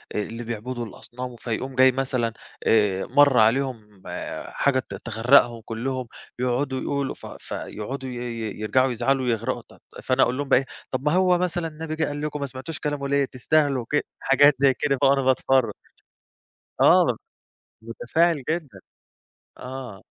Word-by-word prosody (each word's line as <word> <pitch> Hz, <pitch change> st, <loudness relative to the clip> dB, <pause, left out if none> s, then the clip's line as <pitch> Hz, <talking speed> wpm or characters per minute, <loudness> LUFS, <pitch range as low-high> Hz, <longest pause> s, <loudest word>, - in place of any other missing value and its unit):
آآ -, -, +1 dB
اللي 115 Hz, +3 st, -7 dB
بيعبدوا 120 Hz, +1 st, -4 dB
الأصنام 125 Hz, +3 st, -8 dB
فيقوم 125 Hz, +3 st, -4 dB
جاي 130 Hz, +1 st, +6 dB
مثلًا 125 Hz, -3 st, -1 dB, 0.3 s
آآ 105 Hz, -4 st, +3 dB
مَرّ 145 Hz, -3 st, +4 dB
عليهم 110 Hz, -4 st, 0 dB, 0.4 s
حاجة 140 Hz, -2 st, +1 dB
ت 130 Hz, -, -7 dB
تغرّقهم 120 Hz, +1 st, +3 dB
كُلّهم، 125 Hz, +2 st, -3 dB, 0.3 s
يقعُدوا 130 Hz, +2 st, -1 dB
يقولوا 140 Hz, -1 st, -2 dB
ف -, -, -13 dB
ف -, -, -11 dB
يقعُدوا 130 Hz, +5 st, -5 dB
ي -, -, -6 dB
ي 115 Hz, -4 st, -5 dB
يرجَعوا 130 Hz, +4 st, +2 dB
يزعَلوا 130 Hz, +3 st, 0 dB
ويغرَقوا، 120 Hz, +1 st, -1 dB
طيب، -, -, -18 dB, 0.2 s
فأنا 130 Hz, +1 st, +3 dB
أقُول 125 Hz, -, 0 dB
لهم 145 Hz, -1 st, -3 dB
بقى -, -, +6 dB
إيه، 135 Hz, -, -5 dB, 0.3 s
طَب 130 Hz, -, -2 dB
ما 150 Hz, -, +3 dB
هو 180 Hz, -1 st, +4 dB
مثلًا 175 Hz, -1 st, -1 dB
النبي 160 Hz, 0 st, -6 dB
جِه 160 Hz, +1 st, 0 dB
قال 145 Hz, 0 st, -4 dB
لكم 150 Hz, 0 st, -3 dB
ما 140 Hz, -, -2 dB
سمعتوش 135 Hz, +4 st, -7 dB
كلامه 145 Hz, -2 st, -2 dB
ليه؟ 140 Hz, 0 st, +2 dB
تستاهلوا 135 Hz, 0 st, +1 dB
ك 150 Hz, -, +2 dB
حاجات 145 Hz, +2 st, +5 dB
زي 135 Hz, -1 st, +5 dB
كده 140 Hz, -2 st, +2 dB
بقى -, -, +5 dB
وأنا 140 Hz, 0 st, +3 dB
باتفرج. 130 Hz, -1 st, +2 dB, 1.1 s
آه، -, -, +5 dB, 0.6 s
متفاعِل 140 Hz, +7 st, 0 dB
جدًا، 155 Hz, -, -3 dB, 0.8 s
آه. 125 Hz, -6 st, -8 dB
130 Hz, 160 wpm, -24 LUFS, 120-140 Hz, 1.1 s, جاي